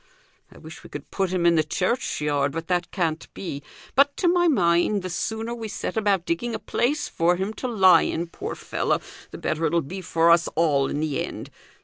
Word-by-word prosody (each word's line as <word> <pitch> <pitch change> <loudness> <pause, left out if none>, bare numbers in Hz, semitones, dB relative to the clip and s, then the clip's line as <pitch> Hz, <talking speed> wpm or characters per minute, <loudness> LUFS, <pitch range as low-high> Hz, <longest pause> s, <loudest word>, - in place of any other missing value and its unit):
I - - -15
wish - - -12
we - - -12
could - - -9
put 190 -2 0
him 180 -1 0
i' 170 - +6
the 160 -2 +3
churchyard, 150 - -1
but 165 +1 -4
that 180 -1 0
can't 165 -4 -2
be; 145 -7 -5 0.3
but, 280 +2 +3
to 360 - +1
my 350 0 +4
mind, 185 - +2
the 185 - -4
sooner 220 +6 -3
we 230 -2 -5
set - - -4
about 200 -5 +1
digging 225 +9 -2
a - - -1
place 290 +5 -1
for 170 +2 +2
him 190 +4 -3
to 255 - -1
lie 195 -6 +6
in, 170 - -1
poor 170 - -6
fellow, - - -1 0.3
the - - -9
better 155 +1 -2
it'll 170 - +2
be 185 +7 -7
for 165 -1 +3
us 170 0 +4
all 145 -4 +2
in 145 - -2
the 150 -4 -1
end. - - -7
175 Hz, 215 wpm, -24 LUFS, 165-220 Hz, 0.3 s, i